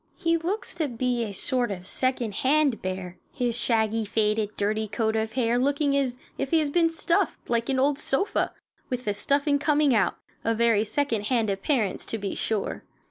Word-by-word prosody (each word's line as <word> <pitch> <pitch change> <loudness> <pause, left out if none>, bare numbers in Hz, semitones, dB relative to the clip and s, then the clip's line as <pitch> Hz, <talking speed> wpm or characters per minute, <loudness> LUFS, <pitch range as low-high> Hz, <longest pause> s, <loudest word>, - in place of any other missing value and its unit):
He 335 -2 +1
looks 380 +8 -2
to 315 - -1
be 245 -1 -1
a 215 - -4
sort 245 +4 +1
of 185 -3 -6
second 255 -1 0
hand 280 -2 +2
bear, 185 -1 -5
his 245 -4 -1
shaggy, 225 -2 +1
faded, 210 0 +1
dirty 215 +2 0
coat 220 +1 -1
of 220 0 -1
hair 240 -1 +1
looking 280 +2 +1
as 260 -3 0 0.2
if - - -1
he 330 - +3
had 300 -3 0
been 335 -2 +4
stuffed, 330 -5 0
like 235 +1 0
an 265 - +1
old 280 +2 +2
sofa, 300 +7 0 0.4
with 250 0 -3
the 205 - 0
stuffing 285 +7 +1
coming 295 -1 +3
out 205 -6 +2 0.3
a 230 +1 +1
very 225 -2 +3
second 230 -4 0
hand 225 -4 +1
appearance, 205 +1 0
to 225 - -1
be 200 -2 -4
sure. 215 -3 -2
240 Hz, 190 wpm, -26 LUFS, 220-285 Hz, 0.4 s, been